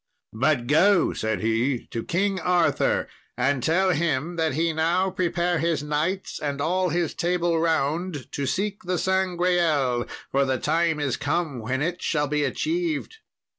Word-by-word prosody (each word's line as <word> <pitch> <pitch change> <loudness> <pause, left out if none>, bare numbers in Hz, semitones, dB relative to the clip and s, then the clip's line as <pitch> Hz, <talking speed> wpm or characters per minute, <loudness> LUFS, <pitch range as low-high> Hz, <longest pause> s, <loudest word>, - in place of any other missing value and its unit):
'But 120 +2 +1
go,' 175 +7 +4
said 110 -1 -2
he, 115 +3 0
'to 115 - -5
King 190 +2 0
Arthur, 180 0 +1 0.3
and 130 +1 +1
tell 185 +7 +2
him, 165 0 -1
that 160 -4 0
he 165 +1 +1
now 175 +4 +1
prepare 175 -2 0
his 165 -2 0
knights 155 +6 -2
and 145 -1 -3
all 180 +5 +1
his 170 -1 -1
Table 175 -1 0
Round 160 -1 0
to 140 -1 -3
seek 200 +5 -2
the 180 0 -2
Sangreal, 175 -9 +1 0.2
for 140 +1 +3
the 130 -1 0
time 160 +2 +1
is 140 -4 -1
come 155 -8 -1
when 130 +5 -2
it 175 +2 -2
shall 150 -2 0
be 150 +1 0
achieved.'" 335 - -2
165 Hz, 155 wpm, -25 LUFS, 140-180 Hz, 0.3 s, go